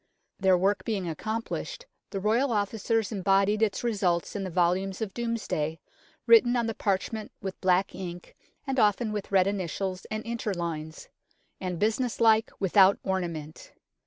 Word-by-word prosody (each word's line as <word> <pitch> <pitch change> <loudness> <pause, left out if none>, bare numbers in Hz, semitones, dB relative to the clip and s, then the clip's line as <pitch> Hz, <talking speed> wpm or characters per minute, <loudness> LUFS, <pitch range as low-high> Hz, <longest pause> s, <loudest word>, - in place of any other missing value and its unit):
Their 190 -2 +4
work 190 +1 +1
being 200 -5 -2
accomplished, 225 - -4 0.2
the 195 - -3
Royal 230 +7 +2
Officers 220 +1 0
embodied 195 +1 +2
its 220 0 +1
results 195 -8 0
in 200 - -2
the 190 - -3
volumes 180 +2 +1
of 215 -3 -4
Domesday, 215 -10 -2 0.5
written 235 +1 +6
on 240 -1 +1
the 225 - -2
parchment 210 +2 -2
with 190 -1 -6
black 185 +1 +2
ink 175 -1 -8 0.3
and 270 -2 -1
often 215 +1 +2
with 205 -2 -5
red 190 -2 +5
initials 190 -1 -3
and 215 0 -3
interlines; 170 -9 -4 0.5
and 180 -2 -3
business 225 +5 0
like, 225 -1 +4
without 195 0 +5
ornament. 170 -5 -4
195 Hz, 145 wpm, -28 LUFS, 185-220 Hz, 0.5 s, written